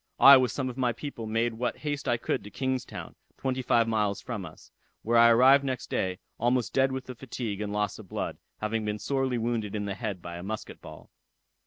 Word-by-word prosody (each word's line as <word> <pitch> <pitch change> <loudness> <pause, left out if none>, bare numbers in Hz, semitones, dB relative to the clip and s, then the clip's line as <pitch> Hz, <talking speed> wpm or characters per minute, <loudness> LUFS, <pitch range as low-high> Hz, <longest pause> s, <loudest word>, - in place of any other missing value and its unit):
I 140 0 +11
with 130 -3 +3
some 135 -2 -2
of 125 0 -6
my 125 -2 +2
people 115 -3 -6
made 115 +2 0
what 120 +2 -2
haste 145 -1 -2
I 120 - +2
could - - -2
to 105 - -9
King's 130 +3 -2
town, - - -8 0.2
twenty 130 -1 -1
five 120 -2 +3
miles 105 -3 0
from 115 -6 -5
us, - - -15 0.3
where 115 +2 +1
I 115 0 +8
arrived 130 +4 +6
next 130 -3 -4
day, 95 -1 -1 0.2
almost 120 0 +1
dead 135 0 +3
with 130 -1 -4
the 130 - -7
fatigue 115 -4 -5
and 105 -1 -3
loss 105 -1 -1
of - - -12
blood, - - -4 0.2
having 110 +1 -1
been 105 0 -2
sorely 135 +1 -1
wounded 115 -3 -2
in 105 -1 -2
the 100 - -2
head 105 -3 -4
by 85 0 -7
a - - -7
musket 110 +3 -6
ball. - - -12
115 Hz, 225 wpm, -28 LUFS, 105-130 Hz, 0.3 s, I